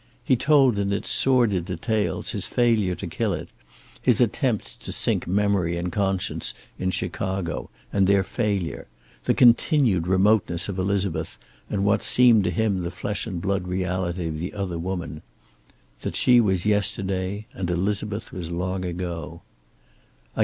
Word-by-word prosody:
He 130 - +3
told 135 -4 +4
in 100 0 0
its 100 - 0
sordid 120 -9 +3
details 105 +4 -2
his - - -2
failure 110 -7 +2
to - - -6
kill - - -1
it, - - -5 0.5
his - - +3
attempts - - 0
to - - -6
sink - - -1
memory 95 -3 +1
and 90 +1 -3
conscience 95 -1 -1 0.2
in 95 - 0
Chicago 95 -1 -3 0.2
and 95 -1 +3
their 100 -1 +4
failure, 100 -5 -2 0.4
the - - +2
continued 120 - +4
remoteness 95 -2 +2
of 100 -2 -4
Elizabeth 100 -1 -1 0.3
and 100 -1 -1
what 100 0 +3
seemed 120 -5 +5
to - - +2
him 100 +1 0
the 85 - -3
flesh 100 +4 -4
and 90 -5 -5
blood 95 -2 -1
reality 90 -1 -2
of 80 -1 -4
the 90 +3 -4
other 95 -5 -3
woman. 85 -3 -4 0.8
That - - -4
she 125 -1 +5
was 95 -4 0
yesterday, 100 -1 -1
and 90 -2 -4
Elizabeth 100 +4 -2
was 85 -3 -5
long 90 +2 -2
ago. 85 -2 -5
95 Hz, 150 wpm, -24 LUFS, 90-105 Hz, 0.8 s, seemed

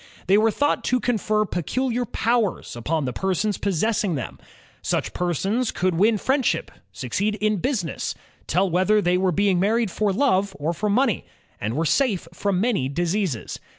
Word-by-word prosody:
They 195 +3 +4
were 225 +1 +4
thought 290 +6 0
to 250 - +2
confer 215 -2 +1
peculiar 245 - -1
powers 230 - -1
upon 150 +5 -1
the 125 - -3
persons 190 - -1
possessing 200 -1 0
them. 130 - -5 0.4
Such - - -1
persons 195 - 0
could 185 0 0
win 210 +6 +3
friendship, 265 +4 0 0.2
succeed 200 - -2
in 215 0 0
business, 195 - -2 0.3
tell 185 +4 +2
whether 185 +4 +3
they 180 -3 +2
were 185 -1 +2
being 195 0 +2
married 215 +2 +1
for 210 +1 0
love 200 -4 +1
or 155 +4 -1
for 210 +5 -2
money, 230 0 +1 0.3
and 110 +3 -2
were 160 +3 0
safe 205 - +1
from 190 +1 -1
many 200 - +1
diseases. 175 - -2
200 Hz, 160 wpm, -23 LUFS, 175-220 Hz, 0.4 s, They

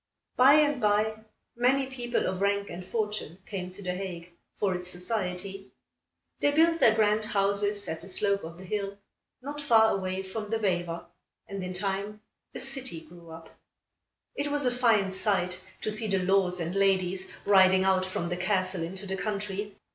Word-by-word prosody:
By 260 +3 +7
and 295 -3 +3
by, 210 +1 +3 0.4
many 260 +3 +3
people 245 -2 -2
of 185 0 -2
rank 200 0 +1
and 175 +2 -6
fortune 210 -4 -3
came 185 -3 -5
to 200 +2 -10
The 180 -1 -2
Hague, 180 -2 -6 0.3
for 195 -2 +1
its 180 0 -4
society. 190 +1 -3 0.7
They 290 - +3
built 330 +3 +4
their 220 -7 +6
grand 215 0 +3
houses 205 -1 0
at 160 0 -4
the - - -9
slope 200 +1 +1
of 165 +1 -8
the 185 - -11
hill, 200 +1 -3 0.5
not 290 +2 -5
far 225 -6 +5
away 190 0 -3
from 210 +2 -6
the 225 - +1
Vijver, 175 -5 -1 0.4
and 195 -1 -5
in 185 0 -4
time 200 +2 -2 0.3
a - - -4
city 265 -9 -3
grew 170 +1 -15
up. 160 0 -12 0.8
It 285 +1 -2
was 290 -1 -1
a 250 - +3
fine 225 -6 +3
sight 190 -2 0 0.2
to 215 - -1
see 215 +1 0
the 195 -2 +1
lords 185 -1 +2
and 170 +1 -3
ladies 190 -1 +1
riding 190 -1 +6
out 190 -1 +3
from 185 -2 -3
the 175 - -2
castle 185 -1 0
into 190 +4 -4
the 190 0 -3
country. 205 -1 -3
195 Hz, 180 wpm, -28 LUFS, 185-215 Hz, 0.8 s, By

